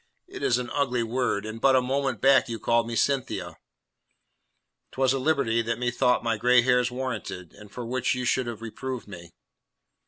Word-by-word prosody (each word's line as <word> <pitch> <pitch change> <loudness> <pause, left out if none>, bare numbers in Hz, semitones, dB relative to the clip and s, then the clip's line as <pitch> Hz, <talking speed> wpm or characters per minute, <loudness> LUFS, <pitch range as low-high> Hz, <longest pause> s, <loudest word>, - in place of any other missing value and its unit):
"It - - -9
is 120 - +2
an 125 -1 -5
ugly 125 -4 0
word, 115 -3 -1
and 110 +1 -7
but 135 -1 +5
a - - +6
moment 135 +1 -1
back 135 -2 +4
you 115 - -3
called 115 +2 +1
me 115 - -4
Cynthia." 135 +2 -1 1.3
"Twas 130 0 +1
a 135 - -1
liberty 130 -5 +1
that 115 0 -2
methought 125 0 +1
my 115 -2 0
grey 125 +2 +4
hairs 125 -1 +3
warranted, 120 -8 -5
and 105 -1 -15
for 120 +2 -6
which 125 +1 -1
you 125 0 -3
should 125 +1 +1
have 115 -1 -6
reproved 125 +2 -6
me." 85 -4 -11
125 Hz, 185 wpm, -26 LUFS, 115-130 Hz, 1.3 s, a